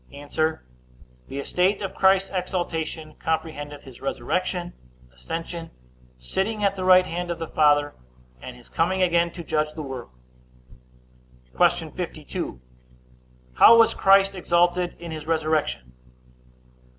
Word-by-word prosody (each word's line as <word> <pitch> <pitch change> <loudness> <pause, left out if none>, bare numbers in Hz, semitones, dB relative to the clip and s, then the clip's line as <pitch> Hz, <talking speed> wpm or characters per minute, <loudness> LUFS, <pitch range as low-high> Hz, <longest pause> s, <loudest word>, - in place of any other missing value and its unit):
A. 140 +1 -10 1.0
The 135 - -7
estate 185 +8 0
of 195 - -4
Christ's 195 0 +3
exaltation 165 -4 -3
comprehendeth 155 -3 -3
his 130 -3 -14
resurrection, 175 +5 -2 0.4
ascension, 165 - -6 0.5
sitting 195 - -2
at 200 -1 +2
the 185 - -4
right 185 0 +6
hand 175 0 -4
of 170 - -2
the 165 -1 -5
Father, 145 -1 +3 0.5
and 125 - -8
his 120 - -17
coming 185 +3 0
again 170 -1 +2
to 170 - -7
judge 155 -1 -1
the 155 - -5
world. 130 - -7 1.5
Q. - - +2
52. - - -5 0.9
How 230 - +8
was 230 - +5
Christ 195 0 +4
exalted 175 -1 +1
in 170 -1 -8
his 155 -1 -7
resurrection? 155 - -1
170 Hz, 125 wpm, -24 LUFS, 150-185 Hz, 1.5 s, How